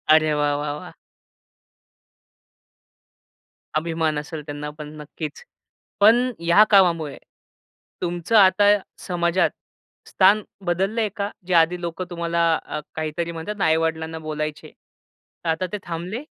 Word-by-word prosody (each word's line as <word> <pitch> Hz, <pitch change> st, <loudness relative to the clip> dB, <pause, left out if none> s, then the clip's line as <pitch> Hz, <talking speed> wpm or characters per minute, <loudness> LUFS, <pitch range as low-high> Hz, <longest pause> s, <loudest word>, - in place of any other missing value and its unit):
अरे 155 Hz, -1 st, +3 dB
वाह! 145 Hz, 0 st, +2 dB
वाह! 145 Hz, 0 st, -2 dB
वाह! -, -, -10 dB, 2.8 s
अभिमान 160 Hz, -1 st, 0 dB
असेल 150 Hz, +1 st, -7 dB
त्यांना 145 Hz, 0 st, -5 dB
पण 150 Hz, 0 st, -8 dB
नक्कीच. 150 Hz, 0 st, -7 dB, 0.6 s
पण 240 Hz, +5 st, +5 dB
ह्या 170 Hz, +5 st, +6 dB
कामामुळे, 170 Hz, -7 st, +3 dB, 0.8 s
तुमचं 175 Hz, +5 st, -1 dB
आता 205 Hz, +1 st, +6 dB, 0.3 s
समाजात 175 Hz, 0 st, +2 dB, 0.6 s
स्थान 200 Hz, +3 st, +4 dB, 0.2 s
बदललंय 195 Hz, +5 st, 0 dB
का? 200 Hz, -1 st, -2 dB, 0.2 s
जे 185 Hz, -, 0 dB
आधी 170 Hz, +1 st, +4 dB
लोकं 170 Hz, +2 st, -4 dB
तुम्हाला 170 Hz, -1 st, -1 dB, 0.2 s
अ, 150 Hz, -, -4 dB, 0.2 s
काहीतरी 160 Hz, +2 st, -3 dB
म्हणतात 195 Hz, +5 st, -6 dB
आई-वडिलांना 160 Hz, 0 st, 0 dB
बोलायचे. 155 Hz, 0 st, -4 dB, 0.7 s
आता 165 Hz, +3 st, 0 dB
ते 210 Hz, -, -2 dB
थांबले? 175 Hz, -, -5 dB
170 Hz, 110 wpm, -23 LUFS, 155-190 Hz, 2.8 s, ह्या